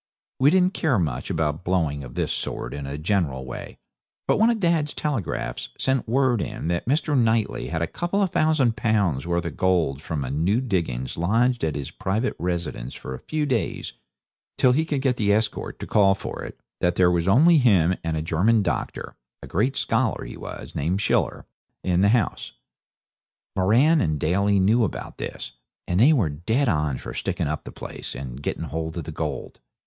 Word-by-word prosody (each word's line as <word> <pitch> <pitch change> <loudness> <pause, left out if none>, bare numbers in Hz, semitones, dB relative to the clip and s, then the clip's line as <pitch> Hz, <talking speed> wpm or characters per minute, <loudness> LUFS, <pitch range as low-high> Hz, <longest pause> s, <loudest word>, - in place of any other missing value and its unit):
We 135 +2 +6
didn't 185 +2 +3
care 145 - +1
much 70 -8 -2
about 80 -2 -1
blowing 80 -6 0
of - - -10
this - - -1
sort - - -4
in 70 -1 -5
a 70 +1 -4
general 75 -6 0
way; 65 - -8 0.5
but - - +2
one 225 +2 +5
of 235 -2 +1
dad's 165 -5 +1
telegraphs 105 - -3
sent 130 -2 0
word 125 -2 +2
in 85 - -4
that 85 +3 -1
Mr. 150 +2 +1
Knightley 115 -3 +1
had 80 0 -2
a - - +2
couple 175 - -2
of 190 - -1
thousand 150 -7 +2
pounds 100 - +1
worth 85 -1 0
of 85 - -4
gold 85 -7 +1
from 80 -3 -3
a 65 - -4
new 85 - +1
diggings 85 - -2
lodged 115 +8 +2
at 80 -2 0
his 70 -2 -5
private 110 +7 -1
residence 85 -8 -3
for 65 - -7
a 65 - -6
few 155 -1 -2
days 125 -7 -2 0.6
till 130 - +5
he 155 +6 +2
could 145 -4 -1
get 130 -3 +2
the 105 -2 +2
escort 110 +2 -1
to - - -6
call 95 -2 +4
for - - -6
it; - - -9 0.2
that 90 0 +1
there 90 -1 +4
was 85 0 0
only 155 - +6
him 95 - +4
and 80 -1 -1
a 80 - -2
German 100 +8 +2
doctor, 85 -4 -3 0.3
a - - -8
great 125 +9 0
scholar 115 -2 0
he - - -8
was, - - -8
named 85 +7 -1
Schiller, - - 0 0.4
in 90 0 +2
the 100 - +5
house. 115 -3 0 1.0
Moran 125 - +4
and 75 -3 0
Daly 100 +6 +2
knew 110 +5 +4
about 105 - -4
this, - - -6 0.4
and 90 +1 +1
they 130 +8 +7
were 120 - +3
dead 110 - 0
on 75 - +1
for - - -7
sticking - - -2
up 75 +1 -3
the - - -7
place - - -8
and 65 0 -7
getting 75 - -3
hold 80 +2 -4
of 85 - -3
the - - -6
gold. - - -5
95 Hz, 195 wpm, -24 LUFS, 80-125 Hz, 1.0 s, they